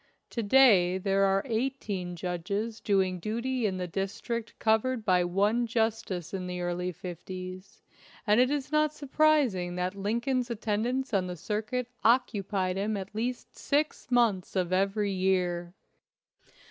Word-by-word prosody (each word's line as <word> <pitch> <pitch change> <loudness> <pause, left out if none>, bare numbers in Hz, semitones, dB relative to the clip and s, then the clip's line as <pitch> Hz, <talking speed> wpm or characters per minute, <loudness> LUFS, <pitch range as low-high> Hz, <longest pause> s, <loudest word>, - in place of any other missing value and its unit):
To 235 - -2
day 205 -6 +5
there 195 +1 +2
are 195 0 +2
eighteen 220 -7 -2
judges 190 +6 -3
doing 190 -3 +1
duty 235 +5 -1
in 190 -2 -2
the 180 - -2
district 195 +6 -4
cov 220 0 +3
ered 255 -3 -3
by 180 -2 +4
one 205 +7 +1
justice 220 -7 -1
in 185 -1 -3
the 180 0 -4
early 175 +1 -2
fifties, 185 +2 -8 0.4
and 210 +1 +4
it 255 - +3
is 285 -1 -2
not 305 0 +3
surprising 275 - +2
that 180 +1 -1
Lincoln's 235 +5 -1
attendance 235 +3 -1
on 190 -2 +1
the 180 0 -5
circuit 220 - -2 0.2
occupied 200 -6 +1
him 205 +2 -1
at 195 +1 -7
least 240 +3 -4
six 295 -1 -1
months 230 -8 +2
of 185 -1 0
every 200 +2 +1
year. 180 -2 0
205 Hz, 145 wpm, -29 LUFS, 185-235 Hz, 0.4 s, day